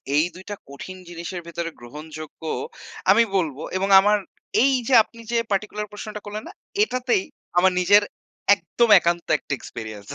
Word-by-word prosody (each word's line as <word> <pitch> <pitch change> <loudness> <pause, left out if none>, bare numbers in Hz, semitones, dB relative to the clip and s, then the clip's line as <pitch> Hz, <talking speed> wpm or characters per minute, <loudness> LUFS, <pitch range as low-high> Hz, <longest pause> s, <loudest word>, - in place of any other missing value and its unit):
এই 150 - +5
দুইটা 190 +3 -7
কঠিন 185 +7 -9
জিনিসের 175 +1 -6
ভেতরে 170 0 -4
গ্রহণযোগ্য 155 +6 -10 0.7
আমি 235 - +6
বলবো, 155 -6 0 0.2
এবং 195 +1 -1
আমার 210 +2 +4 0.5
এই 275 - +4
যে 270 - +1
আপনি 230 +2 -18
যে 235 - +2
পার্টিকুলার 210 +1 -2
প্রশ্নটা 210 0 -7
করলেন 210 +1 -6
না, - - -10 0.3
এটাতেই 255 - 0 0.3
আমার 185 +1 +5
নিজের 205 +3 +6 0.5
একদম 205 +6 0
একান্ত 170 0 -1
একটা 140 - -5
এক্সপেরিয়েন্স 110 -5 -8
185 Hz, 150 wpm, -23 LUFS, 160-210 Hz, 0.7 s, আমি